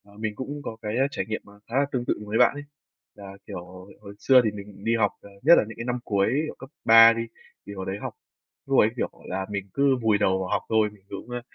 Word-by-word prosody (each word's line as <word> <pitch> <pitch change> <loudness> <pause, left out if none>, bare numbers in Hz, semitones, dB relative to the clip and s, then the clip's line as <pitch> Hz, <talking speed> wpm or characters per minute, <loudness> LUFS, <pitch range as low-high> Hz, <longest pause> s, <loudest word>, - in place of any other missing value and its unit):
Ờ, 100 0 -19
mình 110 -1 -3
cũng 145 +4 -6
có 115 - -6
cái 105 0 -3 0.2
trải - - -3
nghiệm, 110 0 -4
à, - - -16
khá 115 - -6
là 140 - +3
tương 125 -3 -2
tự - - +1
với 105 +2 -1
bạn - - +5
ấy, 145 0 -7 0.5
là, 100 -2 -10 0.2
kiểu, 90 - -7 0.4
hồi 100 - -10
xưa 130 +1 +6
thì 110 - 0
mình 100 -1 -11
đi 115 +1 +1
học, 105 -3 +2
ờ, 100 - -14
nhất 165 +5 +8
là - - +4
những 115 - -10
cái 115 - -5
năm 125 0 -2
cuối, 100 -4 +1 0.2
kiểu, - - -7
cấp 135 - -10 0.2
3 115 +1 +9
đi, 115 0 -3 0.4
thì 100 - -7
hồi 95 -1 -6
đấy 95 +1 -3
học, - - -5 0.5
lúc - - +3
ấy, - - +5
kiểu - - -1 0.2
là, 95 +1 -3
mình 100 -1 -5
cứ 140 -1 +3
vùi 110 -2 +3
đầu 95 -2 +1
vào 95 -1 -4
học - - 0
thôi, 110 -1 +3
mình 100 -2 -20
cũng, 100 +4 -8
ơ, 120 0 -4
110 Hz, 270 wpm, -25 LUFS, 100-120 Hz, 0.5 s, 3